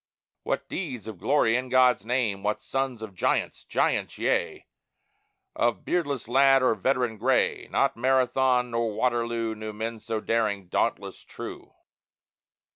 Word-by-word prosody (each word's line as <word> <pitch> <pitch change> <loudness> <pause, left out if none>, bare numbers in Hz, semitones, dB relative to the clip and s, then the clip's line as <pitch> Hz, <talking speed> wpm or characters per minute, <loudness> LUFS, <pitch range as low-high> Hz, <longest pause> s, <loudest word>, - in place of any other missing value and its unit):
What - - -3
deeds 135 - -5
of 110 -5 -8
glory 120 -6 +2
in 130 +1 -2
God's 125 -4 +4
name! 115 -4 -1
What 105 +1 -2
sons 130 -2 -2
of 105 -3 -8
giants 90 - -1
giants, - - 0
yea - - -1 0.9
Or 120 0 +2
beardless 145 -9 -2
lad 135 +1 +5
or 125 - +4
veteran 120 +1 0
gray. 130 +3 +1
Not - - +1
Marathon 125 0 +2
nor 115 -2 -1
Waterloo 115 -1 0
Knew 110 0 -7
men 110 +2 -4
so 110 0 -3
daring, 105 -5 -1
dauntless, - - -1
true. - - -9
120 Hz, 135 wpm, -26 LUFS, 110-130 Hz, 0.9 s, lad